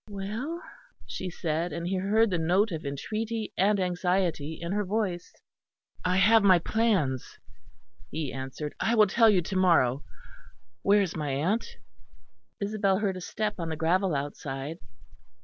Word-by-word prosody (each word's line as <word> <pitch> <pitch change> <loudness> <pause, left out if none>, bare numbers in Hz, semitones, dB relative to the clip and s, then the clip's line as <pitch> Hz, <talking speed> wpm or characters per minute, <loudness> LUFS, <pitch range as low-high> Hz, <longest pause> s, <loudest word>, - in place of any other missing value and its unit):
"Well?" 220 - -5 0.4
she 185 - -5
said; 165 0 -2
and 170 +3 -4
he 190 +1 0
heard 210 +3 +2
the 175 - 0
note 185 +6 +2
of 155 -3 -4
entreaty 220 +10 -3
and 200 +2 +3
anxiety 180 -4 0
in 170 +1 -4
her 210 +1 0
voice. 190 -3 -2 0.7
"I 180 0 +1
have 220 +4 +6
my 190 -3 +6
plans," 175 - 0 0.7
he 155 -2 -4
answered; 135 +3 -5
"I 230 - +1
will 215 -2 +7
tell 225 +3 +4
you 185 -4 +3
to 190 +3 -5
morrow. 155 -8 +3 0.8
Where 205 0 +4
is 185 - -4
my 150 -3 -2
aunt?" 170 +12 -1 0.8
Isabel 200 -2 +1
heard 200 -2 -1
a - - -7
step 210 +2 -3
on 165 -1 -3
the 160 - -2
gravel 175 +2 +1
outside. 140 +2 -4
185 Hz, 150 wpm, -28 LUFS, 160-210 Hz, 0.8 s, will